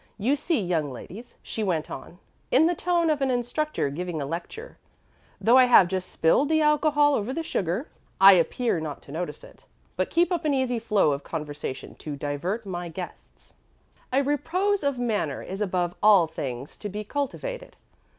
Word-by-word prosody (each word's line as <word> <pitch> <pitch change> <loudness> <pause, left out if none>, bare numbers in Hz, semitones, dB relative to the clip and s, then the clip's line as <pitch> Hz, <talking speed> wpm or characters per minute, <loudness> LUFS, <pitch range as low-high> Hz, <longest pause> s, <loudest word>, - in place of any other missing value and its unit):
You 240 +7 +1
see, 300 +2 0
young 170 -7 -1
ladies," 205 - -10
she 220 - -5
went 170 -6 -1
on, 150 +6 -9 0.3
in 285 +5 +5
the 345 - +3
tone 340 -1 +1
of 295 -2 -1
an 270 - +2
instructor 245 - -1
giving 175 +2 -4
a 140 - -2
lecture, 175 - -7 0.6
"though 240 +3 +5
I 255 - +7
have 245 -7 +7
just 185 0 -3
spilled 270 - +2
the 315 0 +3
alcohol 300 -1 +3
over 225 -1 -1
the 330 +5 -3
sugar, 195 - -2 0.3
I 195 +1 +10
appear 185 +3 +1
not 155 -2 -6
to - - -13
notice 175 - -5
it, - - -16 0.3
but - - 0
keep 340 +1 +2
up 345 -2 0
an 300 -2 +1
easy 255 -3 0
flow 210 -8 +2
of 140 0 -3
conversation 150 -4 -6
to 150 -2 -6
divert 150 +10 -3
my 175 -2 -5
guests. 180 +2 -10 0.6
A 270 +2 +3
repose 360 +7 0
of 280 -2 0
manner 210 - -1
is 195 +3 -6
above 180 -3 0
all 205 -5 +6
things 135 -4 -6
to 210 - -6
be 210 +2 -5
cultivated." 390 - -4
215 Hz, 180 wpm, -26 LUFS, -, 0.6 s, I